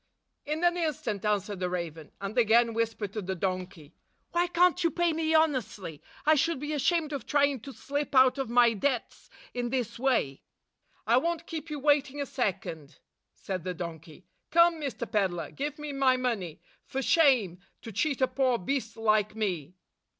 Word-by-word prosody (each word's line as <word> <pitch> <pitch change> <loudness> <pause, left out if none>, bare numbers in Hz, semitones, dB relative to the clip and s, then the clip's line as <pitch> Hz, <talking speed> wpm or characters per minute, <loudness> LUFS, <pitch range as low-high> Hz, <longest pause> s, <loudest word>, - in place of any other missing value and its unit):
"In 305 +3 -2
an 350 0 +3
instant," 265 - -2
answered 205 -2 0
the 180 -1 -1
raven, 165 -4 -5
and 200 +2 -5
again 235 0 +4
whispered 220 -3 -2
to 215 - -3
the 190 0 -3
donkey, 180 -4 -4 0.4
"Why 345 +1 +2
can't 355 +1 +3
you 335 - +4
pay 345 0 +1
me 320 0 0
honestly? 255 - 0 0.2
I 310 - +6
should 325 0 +1
be 295 +2 -3
ashamed 305 +2 +1
of 270 -5 -5
try 285 -1 +4
ing 280 -2 -2
to 275 +5 -9
slip 285 +2 -4
out 260 +1 +6
of 265 -4 -2
my 240 -1 +5
debts 245 +3 -2 0.2
in 245 -1 -2
this 235 -2 -2
way!" 235 - +1 0.6
"I 230 +3 +4
won't 335 +4 -1
keep 325 -1 -6
you 300 - -4
waiting 290 -1 +2
a 285 - -1
second," 175 - -3 0.4
said 185 -3 -5
the 180 0 -3
donkey. 165 0 -8 0.2
"Come, 335 -1 +4
Mr. 270 -4 -3
Peddler, 190 -6 -1
give 290 +1 -4
me 300 -1 -6
my 265 -2 +3
money. 220 -11 -3 0.3
For 270 +1 -3
shame! 255 - +3 0.2
To 225 - -7
cheat 275 - -1
a 260 - +5
poor 260 -3 +1
beast 240 +3 -3
like 215 -1 +2
me! 185 -7 -3
250 Hz, 180 wpm, -29 LUFS, 200-295 Hz, 0.6 s, I